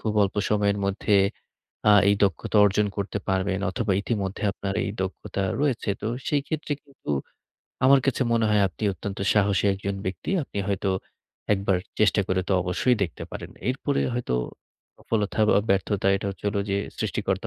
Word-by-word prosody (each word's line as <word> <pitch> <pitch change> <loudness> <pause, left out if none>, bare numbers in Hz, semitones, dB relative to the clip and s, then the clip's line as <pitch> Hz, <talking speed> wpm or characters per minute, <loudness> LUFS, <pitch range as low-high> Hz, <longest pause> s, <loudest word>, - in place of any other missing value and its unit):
খুব 110 - -1
অল্প 100 +1 -1
সময়ের 100 -1 +2
মধ্যে 100 +1 +2 0.7
আ - - +8 0.2
এই 100 - +3
দক্ষতা 100 +3 -1
অর্জন 105 +1 +3
করতে 100 0 -2
পারবেন 95 0 +1
অথবা 100 +1 -1
ইতিমধ্যে 100 -3 -2
আপনার 100 0 -4
এই 100 - -2
দক্ষতা 95 +1 -4 0.2
রয়েছে 130 -8 0
তো 110 - -1 0.2
সেই 145 -2 +1
ক্ষেত্রে 155 -1 -3
কিন্তু 140 - -9 0.7
আমার 135 +1 +7
কাছে 130 -1 +2
মনে 115 -1 +3
হয় 105 -1 +4
আপনি 85 - -14
অত্যন্ত 95 +3 -6
সাহসী 100 -1 +2
একজন 100 +1 -3
ব্যক্তি। 95 - -4
আপনি 100 - -7
হয়তো 100 0 0 0.6
একবার 95 -1 +1 0.2
চেষ্টা 105 -1 +4
করে 95 0 +2
তো - - +2
অবশ্যই 105 +8 +1
দেখতে 85 - -3
পারেন। - - -7 0.2
এরপরে 135 +2 0
হয়তো 120 - -1 0.6
সফলতা 110 -1 -1
বা - - +5
ব্যর্থতা 95 0 +1
এটা 100 - -4
হচ্ছে 95 - -12
হল 100 - -3
যে 100 - +1 0.2
সৃষ্টিকর্তা - - -1
100 Hz, 165 wpm, -25 LUFS, 95-110 Hz, 0.7 s, আ